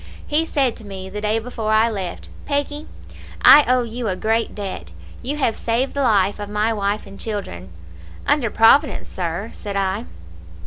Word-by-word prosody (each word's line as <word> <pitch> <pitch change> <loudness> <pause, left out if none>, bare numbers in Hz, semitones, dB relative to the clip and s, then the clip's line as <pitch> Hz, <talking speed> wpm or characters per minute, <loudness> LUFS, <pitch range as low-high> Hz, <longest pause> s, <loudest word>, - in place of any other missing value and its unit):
"He 315 +2 +1
said 270 -6 +1
to 225 - -12
me, 190 -2 -8
the 210 +1 -5
day 215 +1 +1
before 225 -1 -3
I 220 +1 +4
left, 195 -5 -5 0.2
'Peggy, 290 +1 -2 0.6
I 295 - +10
owe 250 0 +3
you 235 0 -4
a 190 - 0
great 225 +4 0
debt. 195 - -6 0.3
You 280 +4 -3
have 250 -6 +1
saved 240 +4 -1
the 280 - -1
life 205 -5 +2
of 205 0 -5
my 210 +2 +1
wife 205 0 -1
and 195 - -12
children.' 190 - -5 0.6
"'Under 285 -5 +2
Providence, 265 +8 +4
sir,' 180 +4 -4
said 200 -2 -6
I. 195 +4 -1
220 Hz, 175 wpm, -21 LUFS, 200-250 Hz, 0.6 s, I